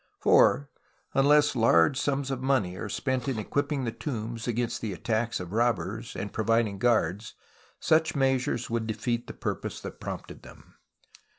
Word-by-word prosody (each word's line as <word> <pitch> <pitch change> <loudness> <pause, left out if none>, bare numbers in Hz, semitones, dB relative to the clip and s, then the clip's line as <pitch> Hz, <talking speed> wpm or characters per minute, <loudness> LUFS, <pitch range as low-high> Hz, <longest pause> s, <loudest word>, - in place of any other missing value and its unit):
For, 140 +3 +4 0.5
unless 145 +1 +4
large 110 -2 +4
sums 140 0 -1
of 130 -1 -3
money 130 -10 +1
are - - -5
spent 130 -2 -2
in 135 -4 -1
equipping 140 +5 -1
the 115 - -1
tombs 115 -1 -5
against 120 0 -1
the 110 -4 -3
attacks 115 +4 -1
of 90 +1 -7
robbers 115 -2 -1
and 100 - -5
providing 110 -2 +1
guards, 110 -3 +1 0.4
such 160 0 +2
measures 130 -3 +1
would 115 -1 -2
defeat 115 +2 -2
the - - -7
purpose - - -4
that - - -8
prompted - - -7
tliem. - - -16
120 Hz, 155 wpm, -28 LUFS, 110-135 Hz, 0.5 s, For